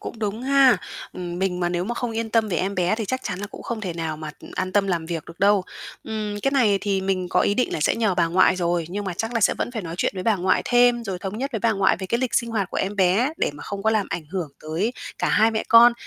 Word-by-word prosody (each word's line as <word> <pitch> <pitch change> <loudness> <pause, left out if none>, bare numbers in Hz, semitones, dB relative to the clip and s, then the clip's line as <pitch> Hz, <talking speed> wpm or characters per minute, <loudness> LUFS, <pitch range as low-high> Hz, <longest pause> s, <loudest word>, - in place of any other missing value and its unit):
cũng 230 - -7
đúng 215 +2 -3
ha. 270 -1 +5 0.4
Ừm, 175 -1 -5
mình 185 -1 -1
mà 175 - +1
nếu 175 0 -1
mà 240 +5 -3
không 245 0 -3
yên 225 0 -3
tâm 225 -1 +2
về 180 - -1
em 195 +4 -1
bé 180 +2 +1
thì 220 0 -3
chắc 260 +6 -2
chắn 180 - -4
là 205 - -4
cũng - - -11
không 235 -2 -4
thể 185 -5 -3
nào 160 -2 -3
mà 155 0 -6 0.2
an 185 0 -2
tâm 200 0 +3
làm 170 -4 -1
việc 165 -2 -4
được 170 - -13
đâu. 200 0 +4 0.4
Ừm, 215 -1 -3
cái 275 - +2
này 230 -8 +3
thì 200 -2 0
mình 190 -1 -1
có - - +2
ý 205 - +2
định 250 - 0
là - - -2
sẽ - - +2
nhờ 215 -5 +1
bà 170 -1 +2
ngoại 185 +2 +4
rồi, 175 -1 0
nhưng 205 +3 -4
mà 190 - -3
chắc 225 +6 -3
là 230 - +1
sẽ 210 - +4
vẫn - - -2
phải 225 -4 -5
nói 165 -1 -6
chuyện - - +1
với 185 - -4
bà 220 0 +2
ngoại 185 0 +1
thêm, 245 -1 +3
rồi 190 -4 -4
thống 195 +3 -5
nhất 275 +3 -3
với 225 - -1
bà 225 +2 +2
ngoại 195 -2 +2
về 190 - -6
cái 235 +5 0
lịch 255 -2 -1
sinh 235 -2 +1
hoạt 200 -5 -1
của - - -4
em 200 +2 -2
bé 200 +9 +3
để - - 0
mà 145 - -10
không 200 -1 -5
có 220 - +3
làm 215 -3 +1
ảnh 165 - -3
hưởng 180 -6 -3
tới 165 +9 -1 0.3
cả - - 0
hai 220 +1 +4
mẹ 220 - -1
con, 235 +1 +8
200 Hz, 305 wpm, -23 LUFS, 180-225 Hz, 0.4 s, con